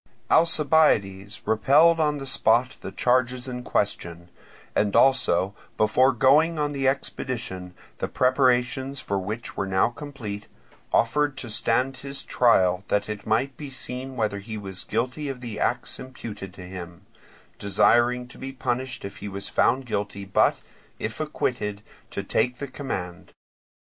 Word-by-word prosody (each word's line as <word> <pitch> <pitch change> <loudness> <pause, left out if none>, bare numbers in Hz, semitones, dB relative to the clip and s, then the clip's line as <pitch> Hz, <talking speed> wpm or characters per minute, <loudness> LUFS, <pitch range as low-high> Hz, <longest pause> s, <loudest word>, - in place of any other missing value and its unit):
Alcibiades 140 - +3
repelled 150 +9 +5
on 150 -1 +2
the 135 - -6
spot 130 -2 +2
the 95 - -6
charges 125 +3 +1
in 125 -1 -5
question, 85 -7 -2 0.5
and 105 -1 +1
also 100 -8 +4 0.2
before 125 +5 +4
going 155 +6 +4
on 150 -1 0
the 135 -2 0
expedition, 115 -9 -3 0.2
the - - -1
preparations 130 +1 +2
for 100 -5 -2
which 105 +5 -5
were 100 - -2
now 95 +3 +3
complete, 120 -6 -7 0.4
offered 145 +5 +2
to 120 - -5
stand 130 +5 +1
his 140 +1 -6
trial, 95 -6 +3
that 105 0 0
it 105 -1 -6
might 125 +5 +1
be 145 +1 -7
seen 130 0 -5
whether 105 -4 -1
he 110 +2 -7
was 95 -3 -5
guilty 125 +6 -2
of 135 -2 -5
the 115 -4 -6
acts - - -1
imputed 115 -7 -8
to 90 - -10
him; 90 -2 -9 0.5
desiring 120 +5 +3
to - - -14
be 135 0 -5
punished 130 -2 -3
if 100 - -8 0.3
found 130 +3 +2
guilty, 100 -3 -3
but, 95 - +2 0.4
if 110 +5 -4
acquitted, 115 -9 -2 0.3
to - - -4
take 125 0 0
the 140 - -5
command. 95 - -6
125 Hz, 145 wpm, -25 LUFS, 100-135 Hz, 0.5 s, repelled